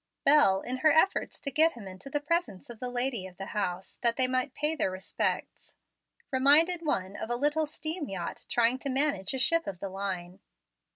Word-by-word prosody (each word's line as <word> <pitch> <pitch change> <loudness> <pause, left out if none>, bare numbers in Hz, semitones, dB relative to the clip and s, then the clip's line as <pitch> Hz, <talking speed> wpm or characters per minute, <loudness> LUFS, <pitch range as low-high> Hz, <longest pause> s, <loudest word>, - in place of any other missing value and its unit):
Bel, 275 -10 +6
in 255 +1 -3
her 310 +4 +4
efforts 320 +6 +1
to 280 - -2
get 320 +4 +4
him 225 -5 -10
into 190 +7 -10
the 290 - -1
presence 295 - -2
of 230 - -11
the 250 - -3
lady 245 -5 -1
of 180 -1 -16
the 195 - -6
house, 190 -2 -3
that 235 -1 +3
they 260 - +3
might 255 +1 -1
pay 300 +2 0
their 265 - 0
respects, 185 0 -4 0.6
reminded 300 +7 +4
one 195 - -2
of - - -6
a 240 - +1
little 295 +4 0
steam 310 +1 -4
yacht 185 -3 -6
trying 240 +2 +2
to 275 - -4
manage 265 -6 0
a - - -2
ship 330 +6 +2
of 185 -3 -5
the 195 - -5
line. 190 -1 -5
255 Hz, 205 wpm, -29 LUFS, 195-295 Hz, 0.6 s, Bel